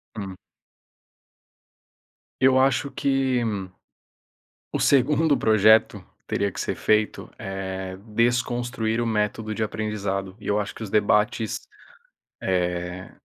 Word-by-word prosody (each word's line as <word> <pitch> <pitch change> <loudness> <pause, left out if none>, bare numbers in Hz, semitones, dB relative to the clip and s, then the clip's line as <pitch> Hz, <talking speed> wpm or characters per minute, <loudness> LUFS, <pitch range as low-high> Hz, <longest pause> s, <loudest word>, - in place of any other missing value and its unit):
Hum. 95 -3 -6 2.0
Eu 130 0 +5
acho 135 +1 +2
que 135 -2 +1 1.3
o - - -1
segundo 145 +1 +3
projeto 110 0 +4 0.2
teria 100 0 0
que - - -7
ser - - -1
feito 110 0 0
é 95 -1 -5
desconstruir 120 0 0
o 120 - 0
método 110 0 -1
de 110 - -3
aprendizado. 100 -3 -3
E - - -8
eu 105 - +2
acho 105 - -3
que - - -9
os 105 - -6
debates, 105 +1 +1 0.8
eh, 90 0 -2
110 Hz, 110 wpm, -24 LUFS, 100-120 Hz, 2.0 s, Eu